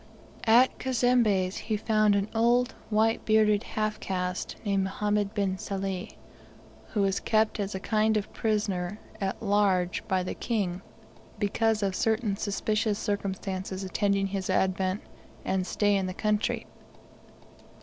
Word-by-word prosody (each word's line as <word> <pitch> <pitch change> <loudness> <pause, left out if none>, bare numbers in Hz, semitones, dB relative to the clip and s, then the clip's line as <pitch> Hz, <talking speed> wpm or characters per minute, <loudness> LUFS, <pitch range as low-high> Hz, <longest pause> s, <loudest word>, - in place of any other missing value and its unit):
At 240 +4 +5
Cazembe's 235 -7 +2
he 215 - -2
found 215 -1 +3
an 200 0 +1
old 240 +2 +3 0.2
white 220 +1 +2
bearded 215 -1 +4
half 215 -2 -2
caste 180 -1 -3
named 195 -2 +1
Mohammed 205 +1 -1
bin 195 -2 0
Sali, 195 -2 -4 0.7
who 210 -4 0
was 195 0 +1
kept 220 0 +1
as 200 -1 -2
a - - -2
kind 215 +2 +2
of 205 - -4
prisoner 205 -3 -1 0.2
at 195 0 -2
large 200 -4 +2
by 185 -1 +1
the 180 - -3
King 195 -6 -2 0.6
because 215 +1 +1
of 195 -1 0
certain 220 -1 +1
suspicious 215 +1 0
circumstances 190 -2 -3
attending 200 +1 +1
his 195 -1 -3
advent 190 +1 +1 0.4
and 190 -1 0
stay 205 -1 +2
in 190 -1 0
the 185 - -5
country. 210 0 0
205 Hz, 135 wpm, -28 LUFS, 190-215 Hz, 0.7 s, At